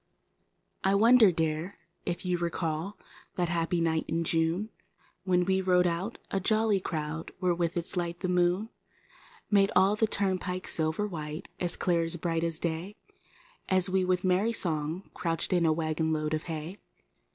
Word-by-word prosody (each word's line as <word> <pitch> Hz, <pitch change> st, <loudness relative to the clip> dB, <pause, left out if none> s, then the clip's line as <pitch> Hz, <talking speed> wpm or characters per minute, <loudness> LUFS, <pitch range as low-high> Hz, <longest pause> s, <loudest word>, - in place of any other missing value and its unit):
E 195 Hz, +1 st, +3 dB
WONDER, 225 Hz, 0 st, +6 dB
Dear, 160 Hz, +3 st, -2 dB, 0.3 s
if 175 Hz, +1 st, -3 dB
you 180 Hz, -1 st, 0 dB
recall 170 Hz, +2 st, -2 dB, 0.4 s
that 175 Hz, -2 st, 0 dB
happy 170 Hz, 0 st, 0 dB
night 160 Hz, -1 st, 0 dB
in 165 Hz, +1 st, -1 dB
June 165 Hz, +6 st, 0 dB, 0.5 s
When 180 Hz, -1 st, +2 dB
we 190 Hz, +1 st, +2 dB
rode 180 Hz, -1 st, +3 dB
out, 175 Hz, +6 st, -2 dB
a 195 Hz, -, +1 dB
jolly 215 Hz, +1 st, +2 dB
crow 160 Hz, -2 st, -4 dB
where 180 Hz, -1 st, +1 dB
with 170 Hz, 0 st, -1 dB
its 175 Hz, +3 st, +1 dB
light 175 Hz, -1 st, -3 dB
the 185 Hz, -, -1 dB
moon 180 Hz, +4 st, +1 dB, 0.8 s
Made 200 Hz, -1 st, +5 dB
all 195 Hz, +2 st, +5 dB
the 220 Hz, +1 st, +2 dB
turn¬ 195 Hz, -3 st, +1 dB
pike 185 Hz, 0 st, -4 dB
silver 160 Hz, +5 st, 0 dB
white 155 Hz, -3 st, -6 dB
as 175 Hz, -1 st, 0 dB
clear 175 Hz, -3 st, +1 dB
and 165 Hz, +1 st, -2 dB
bright 165 Hz, -1 st, -1 dB
as 165 Hz, -1 st, +1 dB
day 170 Hz, +5 st, -3 dB, 0.7 s
As 185 Hz, -1 st, +3 dB
we, 190 Hz, 0 st, +2 dB
with 185 Hz, +1 st, 0 dB
merry 190 Hz, +5 st, +2 dB
song, 160 Hz, -2 st, -1 dB
crouched 165 Hz, +1 st, -2 dB
in 170 Hz, -2 st, +3 dB
a -, -, +4 dB
wagon 160 Hz, 0 st, -1 dB
load 155 Hz, 0 st, -1 dB
of 155 Hz, -, -2 dB
hay? 165 Hz, +3 st, -6 dB
175 Hz, 170 wpm, -29 LUFS, 165-190 Hz, 0.8 s, WONDER